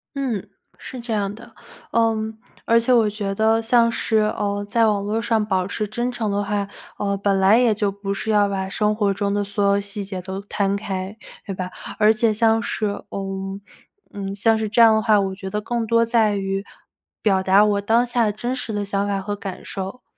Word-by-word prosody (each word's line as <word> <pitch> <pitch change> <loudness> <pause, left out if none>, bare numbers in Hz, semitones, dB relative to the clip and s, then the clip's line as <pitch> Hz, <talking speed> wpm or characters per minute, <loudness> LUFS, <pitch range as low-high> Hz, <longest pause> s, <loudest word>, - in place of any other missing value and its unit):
嗯， 255 -8 -2 0.3
是 255 - -8
这 235 0 -6
样 200 -2 -1
的。 225 - -14 0.4
呃， 225 -1 +3 0.5
而 230 0 +5
且 240 +2 +2
我 225 -3 +4
觉 205 -1 -3
得 220 +2 +2
像 230 0 +3
是， 225 -1 0
呃 205 -1 0
在 230 +1 +3
网 205 -2 +1
络 210 +2 -1
上 225 -2 +1
保 190 -3 0
持 210 +2 -3
真 240 +4 -2
诚 230 -3 -2
的 205 0 0
话， 200 0 -1 0.3
呃 200 -1 0
本 195 0 +1
来 195 +4 +5
也 240 -3 +4
就 205 -1 0
不 200 0 -4
是 200 - -4
要 205 -1 +4
把 190 -1 -3
生 210 +1 +1
活 205 -2 +1
中 200 0 -1
的 205 0 0
所 200 +1 -2
有 200 0 +3
细 200 0 -4
节 190 -2 -5
都 190 +1 -6
摊 200 -1 -1
开， 195 0 -4 0.3
对 195 - -4
吧？ 185 0 -5 0.3
而 215 0 +5
且 220 0 +2
像 225 +1 +2
是 230 -2 -2 0.2
呃 195 0 -4 0.6
嗯 195 -1 -5
像 225 +3 +3
是 220 -1 -2
这 225 - 0
样 225 -1 +8
的 220 - +2
话， 215 -2 +4
我 195 -1 -1
觉 190 0 -7
得 210 - -2
更 235 +1 -2
多 230 +1 +3
在 225 -3 +2
于 195 0 -2 0.6
表 195 -3 +3
达 195 +2 +5
我 205 -1 +1
当 230 +4 +3
下 235 -3 +1
真 240 +5 -3
实 250 -3 -4
的 205 -1 -2
想 200 0 -1
法 200 -1 -1
和 205 +1 -3
感 195 -2 -7
受， 195 +6 -6
205 Hz, 230 characters per minute, -22 LUFS, 200-225 Hz, 0.6 s, 样